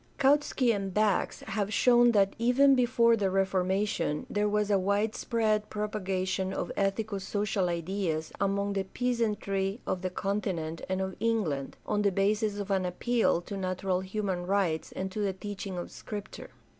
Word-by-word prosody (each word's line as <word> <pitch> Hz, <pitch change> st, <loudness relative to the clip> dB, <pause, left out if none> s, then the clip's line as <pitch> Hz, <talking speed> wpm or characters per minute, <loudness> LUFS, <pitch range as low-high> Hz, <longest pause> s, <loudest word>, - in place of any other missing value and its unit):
Kautsky 275 Hz, -3 st, +3 dB
and 195 Hz, -1 st, -3 dB
Bax 210 Hz, 0 st, +1 dB
have 210 Hz, -1 st, -2 dB
shown 240 Hz, +1 st, +5 dB
that 195 Hz, -2 st, +3 dB
even 255 Hz, +4 st, +5 dB
before 240 Hz, -2 st, +4 dB
the 200 Hz, -3 st, 0 dB
Reformation 190 Hz, -3 st, 0 dB
there 210 Hz, 0 st, +1 dB
was 210 Hz, 0 st, +1 dB
a 200 Hz, -, +4 dB
widespread 215 Hz, +2 st, 0 dB
propagation 190 Hz, -3 st, -2 dB
of -, -, -3 dB
ethico 200 Hz, +1 st, -1 dB
social 195 Hz, -1 st, -1 dB
ideas 170 Hz, -2 st, -2 dB
among 200 Hz, 0 st, 0 dB
the 195 Hz, -, 0 dB
peasantry 210 Hz, -3 st, -1 dB
of 185 Hz, -, -2 dB
the 185 Hz, -, -1 dB
continent 180 Hz, -4 st, -2 dB
and 185 Hz, 0 st, 0 dB
of 190 Hz, -1 st, -3 dB
England, 190 Hz, -13 st, -1 dB
on 210 Hz, -1 st, 0 dB
the 200 Hz, -1 st, +3 dB
basis 205 Hz, +2 st, +1 dB
of 200 Hz, 0 st, -4 dB
an 190 Hz, -1 st, +2 dB
appeal 185 Hz, +1 st, +1 dB
to 200 Hz, -, -7 dB
natural 185 Hz, -1 st, -1 dB
human 190 Hz, -2 st, -3 dB
rights 185 Hz, -5 st, 0 dB
and 190 Hz, 0 st, -4 dB
to 215 Hz, -, -5 dB
the 200 Hz, -2 st, 0 dB
teaching 195 Hz, -1 st, -6 dB
of 175 Hz, -, -5 dB
Scripture. 210 Hz, 0 st, -8 dB
200 Hz, 155 wpm, -29 LUFS, 190-215 Hz, -, shown